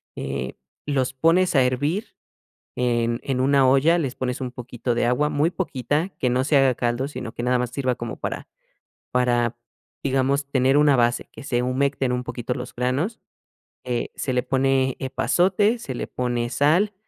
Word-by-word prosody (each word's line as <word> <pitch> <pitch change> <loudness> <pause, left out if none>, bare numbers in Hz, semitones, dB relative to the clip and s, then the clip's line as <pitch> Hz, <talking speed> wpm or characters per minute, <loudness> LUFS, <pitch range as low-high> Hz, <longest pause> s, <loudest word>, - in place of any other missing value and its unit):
eh, 65 -1 -4 0.3
los 135 -3 0
pones 165 +7 +3
a 135 - +6
hervir 145 - -1 0.6
en 120 -1 0
en 130 -2 -1
una 135 0 +4
olla, 140 +6 +4
les 140 -7 -1
pones 125 -1 -3
un 130 -2 -4
poquito 125 0 -4
de 120 - +1
agua, 145 +5 +2
muy 150 +3 +2
poquita, 155 -1 -1
que 125 - +1
no 125 +1 +1
se 145 +1 +3
haga 135 -2 +4
caldo, 120 +3 -1
sino 125 -5 -7
que - - -5
nada 125 +1 +2
más 125 -1 -2
sirva 130 -1 -1
como 120 -2 -6
para - - -4 0.6
para, 120 -2 +1 0.5
digamos, 135 +1 +1
tener 130 0 +3
una 145 -2 +5
base, 120 0 +1
que - - -11
se 120 -2 0
humecten 130 +1 0
un 125 0 -2
poquito 120 0 -3
los - - -7
granos, 130 - -1 0.6
eh, 120 -1 -2
se 130 - -2
le 125 - +2
pone 135 0 +1
epazote, 185 - +2
se 140 - -6
le - - -4
pone 120 -1 -2
sal, 165 - +2
130 Hz, 175 wpm, -23 LUFS, 125-145 Hz, 0.6 s, a